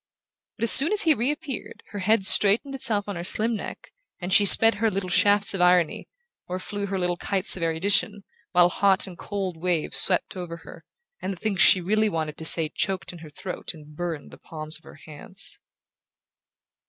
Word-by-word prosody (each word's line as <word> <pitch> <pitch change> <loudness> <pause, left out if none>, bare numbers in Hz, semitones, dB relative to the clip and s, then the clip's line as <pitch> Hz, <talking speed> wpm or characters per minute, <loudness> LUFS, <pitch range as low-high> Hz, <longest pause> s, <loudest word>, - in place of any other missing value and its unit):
But - - -6
as 230 - +6
soon 290 +7 +6
as 420 - +1
he 320 - +3
reappeared 275 +1 -5
her 205 - -7
head 200 +1 +1
straightened 210 +8 +4
itself 225 -7 -1
on 205 - -6
her 170 - -6
slim 220 +5 -1
neck - - -9 0.3
and 180 +1 -4
she 205 -1 +4
sped 225 +3 +7
her 225 - +2
little 190 -2 -5
shafts 205 +1 +3
of 190 - -3
irony, 180 -2 +1 0.4
or 180 - -5
flew 200 +2 -6
her 195 0 -4
little 180 -1 -2
kites 195 +1 +2
of 185 - -9
erudition, 200 +5 -1 0.3
while 175 -1 +3
hot 195 +1 +1
and 185 -3 -9
cold 190 -2 -6
waves 170 -1 -2
swept - - +1
over 175 -2 -8
her, - - -14 0.4
and 195 - -4
the - - -12
things 200 0 -3
she 185 - +5
really 215 +4 0
wanted 155 -4 -5
to 160 - -7
say 160 -1 +6
choked 190 -1 -4
in 175 - -12
her 160 -1 -13
throat 180 +3 -8
and 150 -1 -16
burned 165 -3 -6
the - - -15
palms 155 -1 -8
of - - -29
her - - -15
hands. 180 +5 -7
190 Hz, 200 wpm, -23 LUFS, 175-205 Hz, 0.4 s, sped